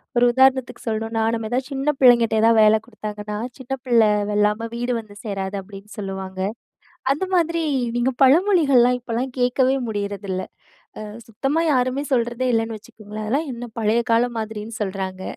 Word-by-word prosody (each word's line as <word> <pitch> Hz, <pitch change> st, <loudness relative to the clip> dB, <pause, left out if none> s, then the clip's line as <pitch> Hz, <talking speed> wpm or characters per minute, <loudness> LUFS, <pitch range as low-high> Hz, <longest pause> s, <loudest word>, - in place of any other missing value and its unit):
ஒரு 240 Hz, -, +3 dB
உதாரணத்துக்கு 260 Hz, 0 st, +2 dB
சொல்லணும்னா 225 Hz, 0 st, -1 dB
நம்ம 225 Hz, -1 st, -2 dB
எதாவது 255 Hz, +1 st, -1 dB
சின்ன 275 Hz, +2 st, 0 dB
பிள்ளைங்கிட்ட 235 Hz, -3 st, +5 dB
எதாவது 225 Hz, 0 st, +5 dB
வேல 215 Hz, +1 st, +6 dB
குடுத்தாங்கன்னா 210 Hz, -2 st, -6 dB, 0.2 s
"சின்ன 260 Hz, 0 st, -6 dB
பிள்ள 235 Hz, -2 st, +4 dB, 0.3 s
வெல்லாம 210 Hz, +2 st, +1 dB
வீடு 245 Hz, +1 st, -1 dB
வந்து 215 Hz, -2 st, -12 dB
சேராது" 195 Hz, -2 st, -4 dB
அப்படின்னு 200 Hz, +1 st, -13 dB
சொல்லுவாங்க. 190 Hz, -1 st, -6 dB, 0.7 s
அந்த 305 Hz, +7 st, -3 dB
மாதிரி 335 Hz, -1 st, +1 dB, 0.4 s
நீங்க 255 Hz, +2 st, +1 dB
பழமொழிகள்லா 280 Hz, -5 st, +5 dB
இப்போலாம் 245 Hz, +2 st, -3 dB
கேட்கவே 255 Hz, +1 st, +2 dB
முடியறதில்லை. 200 Hz, -2 st, -4 dB, 0.5 s
ஆ -, -, -6 dB, 0.2 s
சுத்தமா 270 Hz, +8 st, -1 dB
யாருமே 255 Hz, +2 st, 0 dB
சொல்ரதே 240 Hz, +1 st, 0 dB
இல்லனு 225 Hz, 0 st, -1 dB
வச்சுக்கோங்களேன். 215 Hz, 0 st, -9 dB
அதெல்லாம் 280 Hz, +7 st, -1 dB
என்ன 240 Hz, 0 st, -7 dB
பழைய 220 Hz, +2 st, +2 dB
காலம் 235 Hz, +1 st, +2 dB
மாதிரினு 220 Hz, 0 st, -6 dB
சொல்றாங்க. 190 Hz, -1 st, -4 dB
230 Hz, 145 wpm, -22 LUFS, 210-255 Hz, 0.7 s, வேல